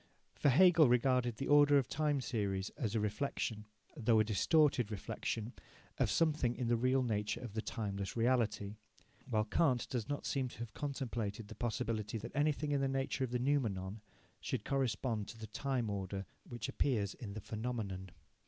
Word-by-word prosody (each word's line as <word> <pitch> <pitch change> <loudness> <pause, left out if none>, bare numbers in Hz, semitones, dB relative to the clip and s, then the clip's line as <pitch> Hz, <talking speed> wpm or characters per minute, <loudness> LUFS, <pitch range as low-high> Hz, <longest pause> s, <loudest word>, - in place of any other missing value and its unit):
For - - +2
Hegel 165 0 +7
regarded 125 -1 +3
the 135 - -4
order 145 0 +6
of 135 -3 +2
the - - -6
time 150 -1 +1
series 100 -6 -2
as 115 -7 -3
a - - +3
reflexion, 105 0 -2 0.3
though 115 -5 +3
a - - +6
distorted 125 - +3
reflexion, 110 +2 -3 0.5
of - - +3
something 150 -7 +2
in 125 -3 -2
the 120 - +4
real 130 +3 +2
nature 105 -3 -1
of 120 -5 -7
the 110 - -1
timeless 100 -2 -4
reality, 110 -4 +1 0.5
while 110 -1 +2
Kant 125 +3 +2
does 120 -4 -3
not 145 - -3
seem 135 -2 0
to - - -11
have 115 -1 -6
contemplated 115 -7 -3
the - - -7
possibility 115 -2 -2
that 110 +4 -8
anything 150 +1 +1
in 140 -1 +2
the 135 - +2
nature 135 0 -1
of 130 - -1
the 125 - 0
noumenon 110 -7 0 0.4
should - - -3
correspond 125 -5 0
to 115 - -9
the 110 - -6
time 120 +2 -2
order 100 -1 -3 0.2
which 120 -5 -4
appears 105 -8 0
in 110 -7 -8
the 110 - -5
phenomenon. 105 -4 -4
120 Hz, 180 wpm, -35 LUFS, 105-135 Hz, 0.5 s, Hegel